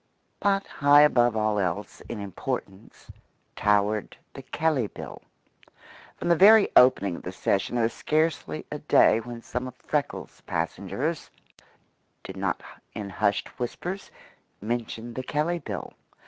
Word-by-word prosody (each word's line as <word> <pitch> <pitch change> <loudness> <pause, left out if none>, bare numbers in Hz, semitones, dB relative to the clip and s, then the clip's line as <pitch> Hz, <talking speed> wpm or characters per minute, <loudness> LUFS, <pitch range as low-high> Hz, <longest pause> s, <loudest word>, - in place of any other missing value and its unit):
But 200 -1 +1
high 145 0 +5
above 120 -6 +4
all 110 -1 +1
else 95 +2 -3
in 115 - -5
importance 95 0 -6 0.4
towered 105 0 +1 0.2
the - - -8
Kelley 155 -8 0
Bill. - - -9 1.0
From - - -4
the 170 - +6
very 210 +4 +7
opening 100 -8 +5
of - - -10
the 90 - -6
session 95 +4 -1
there 120 - +2
was 115 - 0
scarcely 155 - -1
a - - -4
day 110 - +4
when 115 0 -8
some 125 +1 -4
of 125 - -9
Freckles' 150 +1 -4
passengers - - -3 0.9
did - - -8
not - - -2 0.3
in 100 -1 -5
hushed 100 +1 0
whispers 180 +10 -4 0.5
mention 115 +1 -4
the 130 - -4
Kelley 155 +6 -1
Bill. 105 - -6
120 Hz, 135 wpm, -26 LUFS, 105-150 Hz, 1.0 s, very